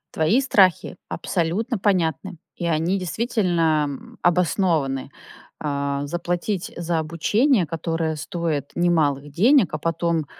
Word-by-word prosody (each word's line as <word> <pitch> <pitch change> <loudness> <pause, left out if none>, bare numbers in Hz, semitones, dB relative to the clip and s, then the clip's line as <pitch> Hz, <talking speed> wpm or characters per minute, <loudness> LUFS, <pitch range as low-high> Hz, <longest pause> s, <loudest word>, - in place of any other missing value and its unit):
Твои 160 +11 +3
страхи 195 -10 +3
абсолютно 195 +8 -1
понятны, 185 -2 0 0.2
и 175 - -5
они 165 +4 +1
действительно, 175 - +1
м, 140 -2 -9
обоснованы. 165 -6 +1 0.5
Э, 140 -1 -2
заплатить 175 +4 -3
за 170 -1 -1
обучение, 185 - +2
которое 165 0 -2
стоит 155 -3 -3
немалых 150 -5 +1
денег, 210 - +4
а - - 0
потом 165 0 -1
170 Hz, 110 wpm, -23 LUFS, 155-185 Hz, 0.5 s, денег